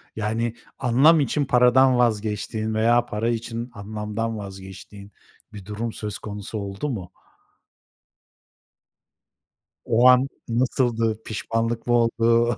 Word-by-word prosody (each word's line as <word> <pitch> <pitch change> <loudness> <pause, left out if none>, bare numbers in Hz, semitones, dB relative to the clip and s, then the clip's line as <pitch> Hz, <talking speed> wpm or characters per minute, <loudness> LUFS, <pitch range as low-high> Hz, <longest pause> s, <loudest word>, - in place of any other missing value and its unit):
Yani, 110 +2 -2 0.2
anlam 135 +6 +5
için 145 +1 0
paradan 125 0 +4
vazgeçtiğin 110 -1 -1
veya 120 +2 +3
para 115 +1 -2
için 115 +1 -4
anlamdan 105 +2 -4
vazgeçtiğin 100 +1 -10 0.4
bir 100 -3 -10
durum 110 +2 -4
söz 105 -2 -5
konusu 105 +1 -6
oldu 100 +7 -4
mu? 95 -9 -5 2.7
O 120 +3 +4
an 130 +2 +5 0.2
nasıldı? 115 -2 0
Pişmanlık 115 +2 -3
mı 120 - +2
oldu? 115 0 +2
115 Hz, 105 wpm, -23 LUFS, 105-120 Hz, 2.7 s, anlam